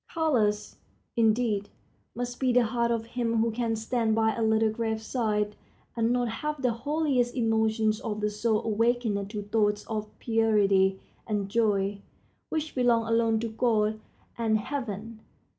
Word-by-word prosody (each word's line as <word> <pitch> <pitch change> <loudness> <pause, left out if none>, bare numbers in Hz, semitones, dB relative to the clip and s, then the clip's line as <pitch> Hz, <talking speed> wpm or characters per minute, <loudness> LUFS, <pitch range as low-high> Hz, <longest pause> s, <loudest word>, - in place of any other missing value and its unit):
Callous, 230 -11 0 0.4
indeed, 220 -2 +2 0.5
must 245 +1 -4
be 260 -2 +2
the 245 0 +4
heart 235 +1 0
of 230 -1 -1
him 230 -1 -1
who 225 +1 +2
can 225 0 -1
stand 225 0 0
by 220 0 +2
a 230 - -3
little 220 0 +3
grave 220 0 -2
side 210 -3 -1 0.4
and 230 -1 +1
not 245 -1 +1
have 300 +6 -3
the 250 -3 +1
holiest 265 -1 0
emotions 220 -2 +1
of 215 -2 -4
the 210 0 0
soul 215 +1 0
awakened 225 -2 0
to 210 -1 -5
thoughts 210 0 0
of 215 -1 -4
purity 200 -4 +2 0.3
and 205 -3 -1
joy, 200 -2 +1 0.5
which 315 -1 -3
belong 240 -3 +2
alone 230 -1 +2
to 230 - -1
God 220 -2 +1 0.4
and 220 -2 +2
heaven. 225 -3 -5
225 Hz, 150 wpm, -28 LUFS, 215-240 Hz, 0.5 s, the